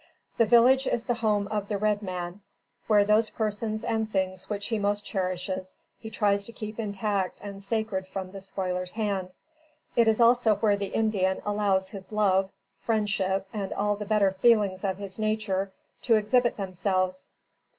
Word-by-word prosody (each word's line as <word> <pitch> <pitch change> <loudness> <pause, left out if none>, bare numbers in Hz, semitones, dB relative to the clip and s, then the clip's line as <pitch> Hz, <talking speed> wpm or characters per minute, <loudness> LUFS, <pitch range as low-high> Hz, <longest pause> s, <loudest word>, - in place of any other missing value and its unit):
The 230 - +4
village 255 +4 +5
is 230 - 0
the 240 - 0
home 210 -4 0
of 210 -1 -2
the 205 - -1
red 210 0 +1
man, 180 0 -5 0.5
where 210 -2 +5
those 215 +2 +3
persons 215 0 -2
and 220 -1 -1
things 190 -1 -2
which 205 -1 -3
he 225 -2 0
most 205 0 0
cherishes, 185 0 -3 0.2
he 220 - -8
tries 205 -2 +1
to 230 - -8
keep 215 -1 -7
intact 200 -3 -1
and 200 -1 -8
sacred 200 -2 -2
from 190 -1 -5
the 195 0 -8
spoiler's 185 -2 -3
hand. 200 -4 -2 0.7
It 235 -1 +4
is 220 0 +3
also 235 -2 +5
where 205 0 +2
the 200 0 -3
Indian 195 -4 0
allows 200 -2 +1
his 195 0 -10
love, 195 -3 +2 0.3
friendship 195 -3 0
and 200 -3 -3
all 205 +1 0
the 210 0 -6
better 205 -2 +3
feelings 195 -1 +3
of 190 -2 -1
his 200 0 -8
nature 215 -3 -1 0.3
to 230 - +4
exhibit 240 +3 +2
themselves. 185 -1 -1
205 Hz, 170 wpm, -27 LUFS, 190-215 Hz, 0.7 s, village